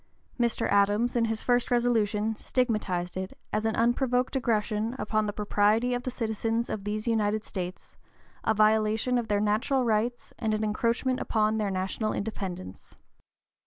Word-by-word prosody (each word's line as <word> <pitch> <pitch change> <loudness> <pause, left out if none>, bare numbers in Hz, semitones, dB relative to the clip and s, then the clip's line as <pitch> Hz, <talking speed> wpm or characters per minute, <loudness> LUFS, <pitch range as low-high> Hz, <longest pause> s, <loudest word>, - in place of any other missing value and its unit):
Mr. 235 -1 +1
Adams, 205 +5 +3
in 235 -1 +3
his 225 -1 -2
first 245 -1 +2
resolution, 225 -3 +1
stigmatized 210 -9 -1
it 185 0 -5 0.2
"as 215 +1 0
an 220 - +1
unprovoked 250 +2 +1
aggression 220 -2 0
upon 215 -3 0
the - - -1
property 210 +3 +2
of 245 - -1
the 255 - -3
citizens 225 -1 -2
of 205 -2 -4
these 215 +2 -3
United 215 -2 +1
States, 185 -3 -6 0.5
a 220 - +2
violation 220 +3 +3
of 235 - -4
their 205 -1 +1
neutral 240 +6 +1
rights, 230 +2 -1
and 220 -3 0
an 215 - -2
encroachment 235 +4 0
upon 215 0 +1
their 210 -2 0
national 190 +3 -2
independence." 185 - -6
220 Hz, 155 wpm, -28 LUFS, 210-240 Hz, 0.5 s, Adams